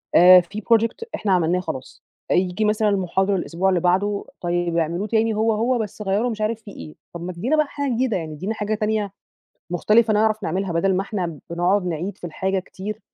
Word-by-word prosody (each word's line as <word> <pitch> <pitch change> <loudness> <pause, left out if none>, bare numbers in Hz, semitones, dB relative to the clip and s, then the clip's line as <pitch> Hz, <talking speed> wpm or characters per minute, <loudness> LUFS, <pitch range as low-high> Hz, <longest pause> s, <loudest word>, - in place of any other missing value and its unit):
آآ، 180 +1 +9
في 200 +5 -8
project 230 - +1
إحنا 200 - -1
عملناه 180 0 +2
خلاص 130 -7 -7 0.3
ييجي 185 +3 +1
مثلًا 210 0 +2
المحاضر 195 0 +1
الأسبوع 180 +1 0
اللي 185 -2 +2
بعده 195 +4 +1 0.2
طيب 175 -1 -1
اعملوه 170 +5 -1
تاني 225 +1 +1
هو 220 +1 +2
هو 235 +4 +1
بس 215 -1 -5
غيروا 210 +4 0
مش 220 -2 -5
عارف 220 +1 -1
فيه 210 - -11
إيه، 155 - -10 0.2
طب 170 - -7
ما 180 +1 -5
تدينا 230 - 0
بقى 305 -1 +2
حاجة 285 -1 -3
جديدة 240 -3 0
يعني 160 -3 -5
ادينا 185 +9 -3
حاجة 215 -1 -2
تانية 215 -2 -1 0.6
مختلفة 215 +5 +3
نعرف 215 0 +2
نعملها، 185 +1 -2
بدل 185 +3 +2
ما 185 - +1
إحنا 180 -7 -4
بنقعد 180 +3 +1
نعيد 180 +3 -3
في - - -12
الحاجة 190 +4 -1
كتير 195 +3 -7
195 Hz, 200 wpm, -22 LUFS, 175-215 Hz, 0.6 s, آآ